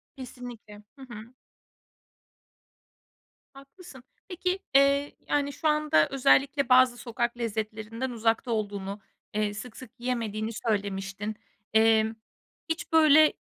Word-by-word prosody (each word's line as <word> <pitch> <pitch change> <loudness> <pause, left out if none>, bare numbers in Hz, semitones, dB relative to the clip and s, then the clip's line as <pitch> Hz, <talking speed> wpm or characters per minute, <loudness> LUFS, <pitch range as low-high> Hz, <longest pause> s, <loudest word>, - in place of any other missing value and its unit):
Kesinlikle. 245 -5 -10
Hı - - -14
hı. 230 +2 -11 2.2
Haklısın. 275 0 -14 0.2
Peki, 365 0 -2 0.2
eee, 280 +1 +4
yani, 285 -1 0
şu 310 - -2
anda 300 - +3
özellikle 275 0 +2
bazı 250 -1 +5
sokak 240 0 -3
lezzetlerinden 220 +2 -4
uzakta 230 +1 0
olduğunu, 205 -2 -3 0.3
eee, 210 -1 -1
sık 220 +3 -8
sık 260 -3 -11
yiyemediğini 225 -3 -2
söylemiştin. 200 -1 -3 0.4
Eee, 220 0 +4 0.6
hiç, 330 +1 -3
böyle, 310 -1 +6
240 Hz, 100 wpm, -27 LUFS, 215-275 Hz, 2.2 s, böyle